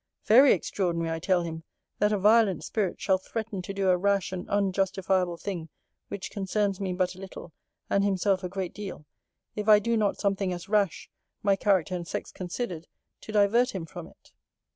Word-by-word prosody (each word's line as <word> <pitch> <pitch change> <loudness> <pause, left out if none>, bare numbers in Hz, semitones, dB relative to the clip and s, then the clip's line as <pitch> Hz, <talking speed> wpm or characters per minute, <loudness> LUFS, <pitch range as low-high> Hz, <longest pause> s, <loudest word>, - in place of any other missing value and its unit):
'Very 260 +6 +7
extraordinary, 170 -3 0
I 165 - -2
tell 180 +1 +1
him, 160 -1 -6 0.4
that 210 0 +3
a 210 - +2
violent 205 -4 +4
spirit 195 +3 -2
shall 190 -1 +2
threaten 215 0 -5
to 180 - -6
do 195 -1 -1
a 180 - +4
rash 200 +1 +1
and 185 -1 -6
unjustifiable 190 -2 +1
thing, 170 -4 -5 0.4
which 200 -1 -6
concerns 200 0 -1
me 195 -2 -2
but 180 0 0
a 185 - -14
little, 190 -3 -9 0.3
and 200 - +2
himself 195 -1 +1
a 180 - -3
great 190 -1 -4
deal, 200 -7 -7 0.5
if 210 0 -2
I 210 - +9
do 230 +3 0
not 210 -2 +1
something 195 -2 0
as 175 -1 -7
rash, 200 -3 0 0.3
my 200 -1 +4
character 190 -4 +1
and 175 -2 -4
sex - - -4
considered, 180 -2 -5 0.3
to - - -9
divert 215 +3 +3
him 175 -4 -3
from - - -9
it. - - -22
195 Hz, 185 wpm, -27 LUFS, 180-205 Hz, 0.5 s, I